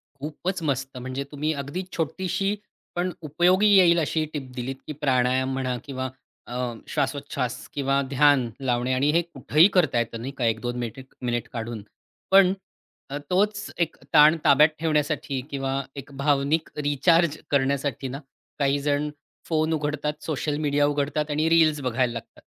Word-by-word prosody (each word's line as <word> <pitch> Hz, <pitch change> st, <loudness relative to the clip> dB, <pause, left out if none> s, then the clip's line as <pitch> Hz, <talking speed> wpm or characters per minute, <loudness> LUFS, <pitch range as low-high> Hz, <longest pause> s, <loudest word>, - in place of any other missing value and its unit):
खूपच 160 Hz, +6 st, -4 dB
मस्त 135 Hz, -3 st, -2 dB
म्हणजे 130 Hz, +2 st, -4 dB
तुम्ही 150 Hz, +2 st, -1 dB
अगदी 145 Hz, +6 st, -4 dB
छोटीशी, 190 Hz, +5 st, -1 dB, 0.4 s
पण 180 Hz, +1 st, 0 dB
उपयोगी 175 Hz, +6 st, +3 dB
येईल 175 Hz, -3 st, +6 dB
अशी 155 Hz, 0 st, 0 dB
टिप 135 Hz, -4 st, -5 dB
दिलीत, 130 Hz, +1 st, -4 dB
की 155 Hz, -, -4 dB
प्राणायाम 130 Hz, -1 st, +2 dB
म्हणा, 130 Hz, -2 st, -1 dB
किंवा 130 Hz, -2 st, -4 dB, 0.4 s
अ, 125 Hz, 0 st, -2 dB
श्वासोच्छवास, 135 Hz, -3 st, -2 dB, 0.2 s
किंवा 140 Hz, -1 st, +1 dB
ध्यान 140 Hz, -3 st, +4 dB, 0.2 s
लावणे 125 Hz, 0 st, +1 dB
आणि 135 Hz, +3 st, +2 dB
हे 170 Hz, +2 st, +3 dB
कुठेही 160 Hz, 0 st, +3 dB
करता 155 Hz, -10 st, +3 dB
येतं 115 Hz, -1 st, -3 dB
नाही 130 Hz, +3 st, -4 dB
का, 125 Hz, -, 0 dB
1-2 115 Hz, +2 st, -1 dB
मेटेक 120 Hz, +3 st, -7 dB
मिनिट 120 Hz, -2 st, -2 dB
काढून. 115 Hz, -2 st, -5 dB, 0.5 s
पण 190 Hz, -1 st, +7 dB, 0.6 s
अ, 140 Hz, -, -3 dB
तोच 205 Hz, +3 st, +1 dB
एक 170 Hz, -2 st, 0 dB, 0.2 s
ताण 155 Hz, +1 st, +7 dB
ताब्यात 150 Hz, +2 st, +7 dB
ठेवण्यासाठी 150 Hz, -3 st, 0 dB
किंवा 135 Hz, -1 st, -1 dB
एक 140 Hz, 0 st, -9 dB
भावनिक 145 Hz, +2 st, +1 dB
रिचार्ज 155 Hz, +3 st, +3 dB
करण्यासाठी 140 Hz, -1 st, 0 dB
ना, 135 Hz, +2 st, -5 dB, 0.4 s
काही 140 Hz, 0 st, +2 dB
जण 145 Hz, +1 st, 0 dB, 0.4 s
फोन 160 Hz, 0 st, +1 dB
उघडतात, 150 Hz, -1 st, -1 dB
सोशल 150 Hz, -1 st, -2 dB
मीडिया 145 Hz, 0 st, +3 dB
उघडतात 145 Hz, +1 st, -1 dB
आणि 155 Hz, +2 st, +1 dB
रील्स 160 Hz, -3 st, +4 dB
बघायला 125 Hz, -1 st, 0 dB
लागतात. 115 Hz, -1 st, -9 dB
145 Hz, 150 wpm, -25 LUFS, 130-155 Hz, 0.6 s, पण